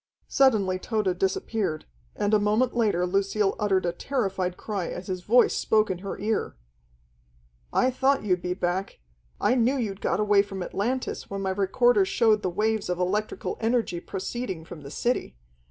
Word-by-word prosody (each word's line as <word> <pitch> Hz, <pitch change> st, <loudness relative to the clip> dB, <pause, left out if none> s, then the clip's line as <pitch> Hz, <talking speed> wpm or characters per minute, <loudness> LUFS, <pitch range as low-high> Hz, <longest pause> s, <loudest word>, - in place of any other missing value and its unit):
Suddenly 210 Hz, -9 st, +3 dB
Tode 195 Hz, -4 st, -1 dB
disappeared, 190 Hz, -3 st, -1 dB, 0.3 s
and 205 Hz, +1 st, 0 dB
a 215 Hz, -, +6 dB
moment 215 Hz, +5 st, +1 dB
later 205 Hz, -7 st, +2 dB
Lucille 195 Hz, +2 st, +1 dB
uttered 195 Hz, -3 st, +1 dB
a 175 Hz, -, +1 dB
terrified 190 Hz, -3 st, -2 dB
cry 200 Hz, -5 st, -3 dB
as 180 Hz, -, -6 dB
his 185 Hz, -1 st, -4 dB
voice 240 Hz, +7 st, +4 dB
spoke 215 Hz, -2 st, +2 dB
in 180 Hz, -, -4 dB
her 195 Hz, +1 st, -5 dB
ear: 215 Hz, +2 st, -2 dB, 1.2 s
"I 255 Hz, -, +2 dB
thought 270 Hz, +1 st, +2 dB
you'd 180 Hz, -4 st, +1 dB
be 180 Hz, 0 st, -2 dB
back. 185 Hz, +1 st, -2 dB, 0.4 s
I -, -, +3 dB
knew 255 Hz, +2 st, +2 dB
you'd 205 Hz, -5 st, -3 dB
got -, -, 0 dB
away 205 Hz, -1 st, +4 dB
from 195 Hz, -2 st, -5 dB
Atlantis 245 Hz, +8 st, -3 dB
when 195 Hz, 0 st, -4 dB
my 190 Hz, -1 st, -1 dB
recorder 240 Hz, -, +3 dB
showed 225 Hz, -, +2 dB
the 185 Hz, -, -1 dB
waves 215 Hz, +2 st, -1 dB
of 180 Hz, -, 0 dB
electrical 200 Hz, +4 st, -2 dB
energy 225 Hz, -6 st, 0 dB
proceeding 190 Hz, -2 st, -5 dB
from 165 Hz, -2 st, -10 dB
the 140 Hz, -, -9 dB
city. 235 Hz, -, -2 dB
200 Hz, 170 wpm, -26 LUFS, 185-225 Hz, 1.2 s, a